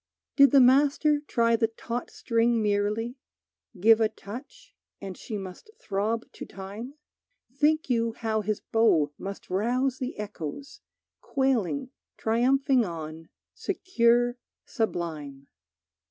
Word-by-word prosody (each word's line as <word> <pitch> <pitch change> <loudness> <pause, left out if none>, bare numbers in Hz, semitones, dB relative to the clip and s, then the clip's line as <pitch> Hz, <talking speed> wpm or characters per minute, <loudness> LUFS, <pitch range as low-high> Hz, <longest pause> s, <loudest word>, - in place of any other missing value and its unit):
Did 280 -1 +7
the 280 - +6
Master 285 +4 +4
try 230 -1 +3
the 225 0 +2
taut 230 +2 -5
string 230 -1 +1
merely, 215 +4 0 0.6
Give 225 +3 +6
a 220 - +3
touch, 250 - -11 0.2
and 195 -2 -7
she 215 +3 -6
must 190 - -9
throb 215 +3 -2
to - - -9
time? 205 +8 -8 0.6
Think 305 +3 +2
you 230 -2 +1
how 220 -1 -1
his 210 0 -2
bow 170 -10 +2
must 195 -1 -7
rouse 245 +7 0
the 255 0 -4
echoes, 210 - -7 0.4
Quailing 265 0 0 0.3
triumphing 255 +3 +2
on, 160 -3 -7 0.2
secure, 240 -8 +1 0.3
sublime! 155 -10 -3
230 Hz, 115 wpm, -27 LUFS, 205-260 Hz, 0.6 s, Did